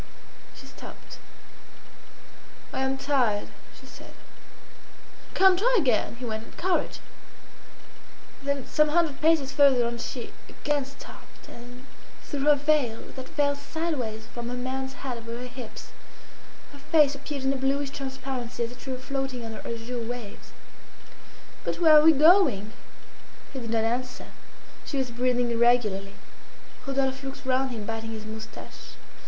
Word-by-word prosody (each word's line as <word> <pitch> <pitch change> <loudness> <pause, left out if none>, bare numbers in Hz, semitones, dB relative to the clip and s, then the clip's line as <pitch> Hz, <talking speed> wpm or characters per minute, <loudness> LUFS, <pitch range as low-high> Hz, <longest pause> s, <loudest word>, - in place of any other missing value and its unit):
She - - -12
stopped. - - -11 1.5
"I - - -2
am 265 0 0
tired," 255 -7 +1 0.3
she - - -15
said. - - -13 1.2
"Come, 380 -1 +7
try - - +3
again," 250 - +1
he 245 +1 -7
went 220 -1 -3
on. - - -15
"Courage!" 365 0 0 1.4
Then 280 -1 -2
some 305 0 +3
hundred 315 -3 +1
paces 310 -4 +3
farther 275 -4 +5
on 235 0 -3
she 245 0 -5 0.2
again 290 -2 -1
stopped, 275 - -14
and 245 +2 -12 0.4
through 285 -2 -3
her 295 0 +7
veil, 285 -6 +1
that 260 -1 -8
fell 285 -1 +1
sideways 280 -8 -3
from 240 -1 -5
her 250 - -3
man's 265 +1 -3
hat 250 -3 -2
over 230 0 -6
her 250 - -6
hips, 250 -2 -9 0.8
her 285 - -13
face 295 0 +4
appeared 280 0 -5
in 265 +1 +2
a - - -2
bluish 275 +1 0
transparency 265 -3 -4
as 230 - -3
if 245 - -12
she - - -8
were 260 - -2
floating 265 -2 -3
under 225 -1 -6
azure 235 +1 -4
waves. 230 -3 -7 1.1
"But - - -2
where 320 -3 +7
are 300 - +10
we 320 - +9
going?" 290 - +5 0.8
He 265 - -4
did 230 -2 -6
not 225 -1 +1
answer. 245 +2 -2 0.5
She 285 - -4
was 260 -2 -1
breathing 245 0 +1
irregularly. 230 -5 +2 0.7
Rodolphe 270 -1 0
looked 270 0 -7
round 260 +1 +2
him 225 -4 -5
biting 225 0 -4
his 215 -1 -7
moustache. 220 0 -9
260 Hz, 150 wpm, -27 LUFS, 235-280 Hz, 1.5 s, are